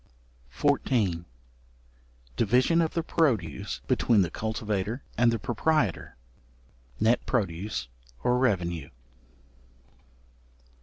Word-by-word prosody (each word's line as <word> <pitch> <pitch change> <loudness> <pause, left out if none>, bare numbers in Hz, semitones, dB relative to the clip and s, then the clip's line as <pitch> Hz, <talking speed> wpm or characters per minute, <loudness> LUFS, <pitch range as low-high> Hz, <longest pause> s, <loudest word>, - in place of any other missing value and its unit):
§14. 95 -9 +1 1.1
Division 125 - +3
of 165 0 -1
the 165 - 0
produce 125 - 0
between 110 -5 +3
the 85 - -3
cultivator 110 +1 -3
and 120 0 +4
the 115 - 0
proprietor. 120 - 0 0.8
Net 115 +2 +3
Produce, 95 - -2 0.4
or 125 0 +2
revenue. 85 - 0
110 Hz, 85 wpm, -27 LUFS, 95-125 Hz, 1.1 s, and